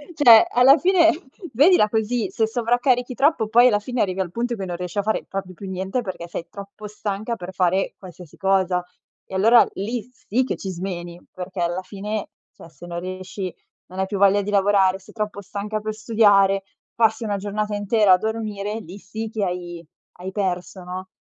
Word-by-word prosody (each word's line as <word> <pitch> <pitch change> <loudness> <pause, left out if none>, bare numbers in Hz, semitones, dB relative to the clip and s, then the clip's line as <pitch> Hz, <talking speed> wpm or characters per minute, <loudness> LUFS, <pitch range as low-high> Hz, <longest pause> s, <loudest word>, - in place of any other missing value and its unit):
Cioè, 235 -7 +8
alla 265 +5 +6
fine 360 -3 +4 0.4
vedila 285 - +5
così, 220 +1 -1
se 220 - +1
sovraccarichi 245 +2 +1
troppo 270 -4 +2
poi 240 +3 +6
alla 205 -4 +3
fine 245 +3 -3
arrivi 190 -1 -1
al 175 -2 -4
punto 235 +2 -2
che 195 -3 -5
non 175 - -4
riesci 180 +1 -6
a 205 - +3
fare 220 +2 -1
proprio 195 -1 -6
più 195 +2 -9
niente 190 +6 -2
perché 185 -4 -6
sei 170 0 -6
troppo 200 +1 -10
stanca 210 +2 -4
per 190 -2 -8
fare 185 +1 +1
qualsiasi 180 -4 -13
cosa. 190 -2 +1 0.4
E - - -14
allora 225 +5 +6
lì 225 +4 -4
sì 250 +1 -1
che - - -3
ci 195 - -6
smeni, 175 -1 -6
perché 185 0 -7
alla 175 +2 -1
fine, 210 +2 -5 0.2
cioè, - - -14
se 175 - -13
non 170 0 -5
riesci, 185 0 -6 0.3
non 185 +1 -9
hai 190 - +1
più 200 +1 -4
voglia 200 +1 +5
di 205 - -4
lavorare, 195 -1 +3
sei 190 - -17
troppo 210 -2 -3
stanca 205 +2 -4
per 215 0 -4
studiare, 205 -3 +3 0.3
passi 225 0 +2
una 205 -2 -1
giornata 210 +1 -3
intera 205 -1 +3
a - - +6
dormire, 215 0 -3
lì 185 -1 -10
sì 215 +3 -6
che 215 -2 -3
hai 175 -2 -4 0.3
hai 185 +2 -6
perso, 185 -1 -3
no. 185 +1 -7
200 Hz, 190 wpm, -22 LUFS, 185-220 Hz, 0.4 s, Cioè